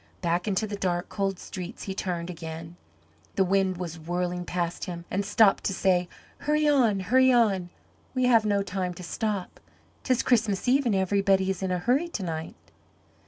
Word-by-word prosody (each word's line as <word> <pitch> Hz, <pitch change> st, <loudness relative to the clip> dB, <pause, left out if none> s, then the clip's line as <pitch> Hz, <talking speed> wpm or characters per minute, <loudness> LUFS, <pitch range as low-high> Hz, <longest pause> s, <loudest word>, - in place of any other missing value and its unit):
Back 175 Hz, +2 st, 0 dB
into 205 Hz, +1 st, +1 dB
the 210 Hz, -1 st, -4 dB
dark, 175 Hz, -3 st, -1 dB
cold 195 Hz, -2 st, -1 dB
streets 180 Hz, 0 st, -7 dB
he 195 Hz, -, -4 dB
turned 180 Hz, -2 st, -3 dB
again. 165 Hz, 0 st, -8 dB, 0.6 s
The 195 Hz, -, +4 dB
wind 190 Hz, -1 st, +1 dB
was 170 Hz, -2 st, -5 dB
whirling 175 Hz, +2 st, -2 dB
past 175 Hz, -1 st, -2 dB
him 175 Hz, -2 st, -6 dB
and 195 Hz, +2 st, 0 dB
seemed 205 Hz, 0 st, +4 dB
to 195 Hz, -, 0 dB
say, 180 Hz, -2 st, +2 dB, 0.3 s
"Hurry 300 Hz, +1 st, +1 dB
on, 240 Hz, -9 st, +3 dB
hurry 260 Hz, +7 st, +4 dB
on, 200 Hz, -7 st, +2 dB, 0.5 s
we 255 Hz, -, +1 dB
have 230 Hz, -3 st, +5 dB
no 200 Hz, -2 st, +1 dB
time 185 Hz, -2 st, -3 dB
to 180 Hz, -, -9 dB
stop. 200 Hz, +1 st, -3 dB, 0.4 s
'Tis 255 Hz, -1 st, +1 dB
Christmas 220 Hz, -4 st, +1 dB
Eve 265 Hz, +1 st, +3 dB
and 215 Hz, -, +2 dB
everybody 190 Hz, 0 st, +2 dB
is 190 Hz, -, -5 dB
in 190 Hz, -, -1 dB
a 180 Hz, -, 0 dB
hurry 250 Hz, -, +1 dB
to 220 Hz, -, -5 dB
night." 160 Hz, -2 st, -4 dB
190 Hz, 180 wpm, -27 LUFS, 180-215 Hz, 0.6 s, have